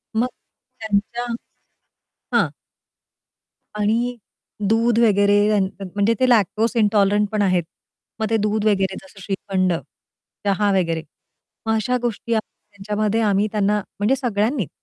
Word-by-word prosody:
मग 235 +3 +2 0.5
त्यांच्या 220 +3 -1 1.1
हां. - - +4 1.3
आणि 230 +4 +1 0.5
दूध 230 +1 +3
वगैरे 205 -2 +4
त्यानं 205 -3 +2
त्या 195 0 -9
म्हणजे 205 +3 +2
ते 255 - +4
लॅक्टोज 220 0 +3
इंटॉलरंटपण 205 -1 +2
आहेत. 185 -3 +2 0.6
मग 220 - +1
ते 225 - +3
दूध 210 0 0
वगैरे, 195 -2 +2
जसं 190 +1 -16
श्रीखंड, 190 -1 -1 0.7
चहा 205 +1 +2
वगैरे. 165 -3 -1 0.6
मग 220 - +2
अशा 220 +3 +1
गोष्टी 235 0 -2
आम्ही 220 - -5
त्यांच्यामध्ये 210 +2 -1
आम्ही 205 -1 +2
त्यांना, 210 0 +1 0.2
म्हणजे 215 +7 +2
सगळ्यांनीच 225 - 0
210 Hz, 120 wpm, -21 LUFS, 200-225 Hz, 1.3 s, हां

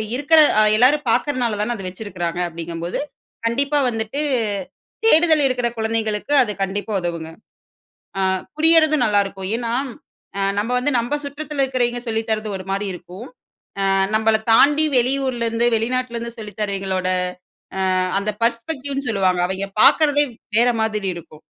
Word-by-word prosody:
இருக்கிற 290 +4 +4 0.2
அ - - +5
எல்லாரும் 270 +4 +3
பார்கிறனால 240 -5 0
தானே 240 +3 -1
அத 195 -4 -7
வைச்சுருக்கிறாங்க, 180 -3 -5
அப்படிங்கம் 165 0 -6
போது 175 - -3 0.5
கண்டிப்பா 280 +5 0
வந்துட்டு 225 +4 -4 0.9
தேடுதல் 320 -7 +5
இருக்கிற 250 -2 -1
குழந்தைகளுக்கு 220 +2 -2
அது 220 - -3
கண்டிப்பா 200 +3 -4
உதவுங்க. 170 -2 -4 0.9
ஆ - - +1 0.4
புரியறது 315 -1 +5
நல்லா 205 -1 +3
இருக்கும். 195 -1 -6
ஏனா 235 -1 -3 0.7
ஆ - - 0 0.2
நம்ப 210 +4 -1
வந்து 265 +4 0
நம்ம 240 +5 -1
சுற்றத்தில 290 0 -4
இருக்கிறவங்க 245 -2 -1
சொல்லி 225 -1 0
தரது 215 -1 -1
ஒரு 185 - -8
மாரி 200 +1 -1
இருக்கும். 180 +3 -10 0.6
ஆ - - +2 0.2
நம்மள 220 0 +3 0.2
தாண்டி 295 +6 +5
வெளியூரிலருந்து 240 -2 0
வெளிநாட்டிலருந்து 235 0 -2
சொல்லி 215 -2 -8
தருவிங்களோட 195 -2 -2 0.9
அ - - +2 0.2
அந்த 200 +2 -2
பர்ஸ்பெக்டிவ்னு 270 +4 -2
சொல்லுவாங்க. 190 -4 +1
அவங்க 190 +2 -3 0.2
பார்க்கிறதே 290 -2 +5 0.3
வேற 240 +2 +4
மாதிரி 210 -3 -1
இருக்கும். 155 -2 -12
230 Hz, 135 wpm, -20 LUFS, 200-270 Hz, 0.9 s, அ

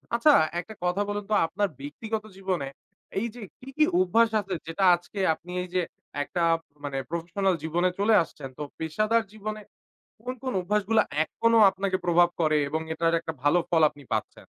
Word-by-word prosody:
আচ্ছা, 295 +6 +5 0.3
একটা 200 +5 -7
কথা 180 +3 +1
বলুন 205 0 -2
তো, - - +3
আপনার 195 +4 -1
ব্যক্তিগত 215 +10 -4
জীবনে, 185 -8 -2 0.5
এই 235 - -1
যে 240 - -9 0.2
কি, 260 - -11
কি 305 - +6
অভ্যাস 225 +5 +4
আছে, 195 -2 -4
যেটা 165 +4 -2
আজকে 175 +3 -9
আপনি 175 +3 -11
এই 180 - -9
যে 180 - +3 0.4
একটা 175 - -3 0.4
মানে, 140 -1 -3
প্রফেশনাল 175 +3 0
জীবনে 175 +3 +1
চলে 215 +2 +4
আসছেন। 135 -4 -10
তো 150 - -4 0.2
পেশাদার 215 +8 +1
জীবনে 215 0 -5 0.6
কোন, 255 - -4
কোন 255 - -2
অভ্যাসগুলো 210 +3 +2 0.2
এখনো 230 +7 +2
আপনাকে 190 -1 -1
প্রভাব 175 0 +5
করে? 155 -1 +3
এবং 160 +1 -1
এটার 165 +1 +1
একটা 160 - -5
ভালো 145 +5 +4
ফল 165 -2 +3
আপনি 145 -1 -16
পাচ্ছেন। - - -3
185 Hz, 175 wpm, -27 LUFS, 165-215 Hz, 0.6 s, কি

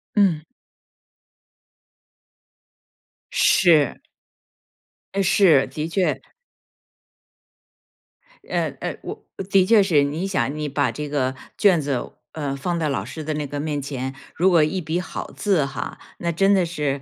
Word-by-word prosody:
嗯。 190 -7 +3 2.9
是。 165 - +4 1.2
诶， 195 - +1
是， 175 -7 +5
的 150 +4 -4
确。 180 +2 0 2.3
嗯 - - -1
嗯， - - -3
我 - - -8 0.2
的 195 -2 +5
确 220 +1 +6
是。 160 -7 +3
你 155 +7 -2
想 185 -7 -1
你 150 -1 -2
把 140 -1 +1
这 150 -1 -5
个 130 -3 0 0.2
卷 190 -6 +4
子， 140 -4 -3 0.2
嗯， 145 -3 -3
放 170 +5 -2
到 160 -2 0
老 130 -9 -1
师 130 +6 -7
的 155 +1 -2
那 150 -1 -3
个 145 +1 -5
面 145 -1 -2
前， 130 -1 -4 0.2
如 185 +3 +3
果 170 -4 +5
一 160 +5 -1
笔 160 +2 -2
好 180 - -6
字 190 -9 +1
哈， 135 0 -6 0.2
那 170 - -1
真 195 +4 +3
的 190 -3 +3
是， 150 -5 -2
155 Hz, 145 characters per minute, -22 LUFS, 140-180 Hz, 2.9 s, 确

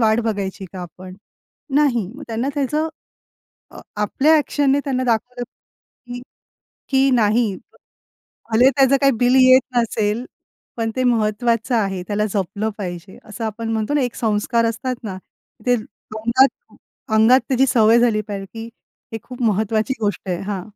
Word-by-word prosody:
वाट 220 0 +3
बघायची 200 -3 -3
का 185 - -7
आपण? 185 +2 -10 0.6
नाही. 255 -9 +2
मग 295 - -10
त्यांना 230 +4 -2
त्याचं 300 +3 -1 0.8
अ, - - -11 0.2
आपल्या 300 +9 +3
एक्शनने 285 -1 +1
त्यांना 255 -2 -1
दाखवलं, 245 +1 -1 1.5
की 270 0 +4
नाही, 220 -2 +2 1.0
भले 245 +4 +6
त्याचं 275 0 +5
काही 275 -1 +4
बिल 245 +1 +3
येत 255 0 +7
नसेल, 225 0 0 0.5
पण 225 -1 -1
ते 255 - 0
महत्वाचं 230 +1 +1
आहे, 195 -4 -1
त्याला 210 +1 0
जपलं 205 +3 -2
पाहिजे. 180 -1 -7
असं 225 +2 -7
आपण 225 +1 -4
म्हणतो 220 +6 -1
ना 295 - +2
एक 245 - -2
संस्कार 225 +1 0
असतात 255 +3 -2
ना. 190 -3 -5 0.5
ते 245 - +4
अंगात 230 +4 0 0.7
अंगात 230 +4 +6
त्याची 265 0 +3
सवय 225 0 +5
झाली 230 -3 +2
पाहिजे 200 -2 -6
की 225 0 -6 0.5
हे 225 - -3
खूप 250 -1 -9
महत्वाची 220 +3 +1
गोष्ट 205 -2 -2
आहे 175 -1 -2
हां. 195 -2 -4
225 Hz, 145 wpm, -20 LUFS, 210-255 Hz, 1.5 s, येत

